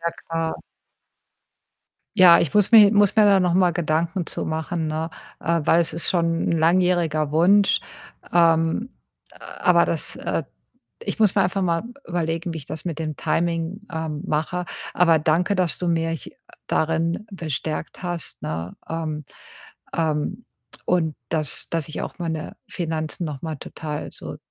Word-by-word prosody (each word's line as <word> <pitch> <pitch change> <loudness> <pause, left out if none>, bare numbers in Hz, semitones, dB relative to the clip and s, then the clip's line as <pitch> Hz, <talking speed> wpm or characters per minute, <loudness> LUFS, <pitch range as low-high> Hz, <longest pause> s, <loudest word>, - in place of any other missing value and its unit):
Ja, 170 0 -1 0.2
klar. 165 0 -2 1.6
Ja, 180 -3 +8
ich 160 - 0
muss 210 +1 +3
mir 215 -2 +9
muss 205 0 +4
mir 215 - +7
da 200 -2 +5
noch 180 -1 +2
mal 180 -1 +4
Gedanken 170 +2 -1
zu - - -4
machen, 160 +1 -2
ne? 155 +1 -2 0.3
Äh, 170 -1 +1
weil 170 - +4
es 160 -1 0
ist 170 - -1
schon 165 -2 +1
'n - - +1
langjähriger 165 -2 +2
Wunsch. 195 +6 +4 0.5
Ähm, 165 +6 +3 0.7
aber - - +5
das - - -2
äh, - - -2 0.6
ich - - -4
muss 210 -2 +4
mir 195 - +4
einfach 185 +2 -1
mal 170 0 +1 0.2
überlegen, 165 0 -2
wie - - -4
ich 150 - -9
das 155 +2 -6
mit 170 -4 -4
dem 155 -2 -3
Timing, 170 +6 -1
ähm, 160 0 -3
mache. 175 +3 -1 0.3
Aber 165 -3 +5
danke, 165 +6 +2
dass 180 -5 0
du 180 - -3
mich, 165 -1 -1
äh, - - -10 0.3
darin 165 +6 0
bestärkt 160 -2 -4
hast, 175 -2 -5
ne? 80 +3 -4
Ähm, 155 -2 -3 0.7
ähm, 160 +7 -1 0.4
und 160 -4 +1
dass 155 -4 -1
dass 165 -3 -1
ich 155 - -4
auch - - -6
meine 160 -2 -4
Finanzen 160 0 -3
noch 145 -4 -5
mal 160 -2 -3
total 150 +1 -6
so - - -8
165 Hz, 155 wpm, -23 LUFS, 160-180 Hz, 1.6 s, mir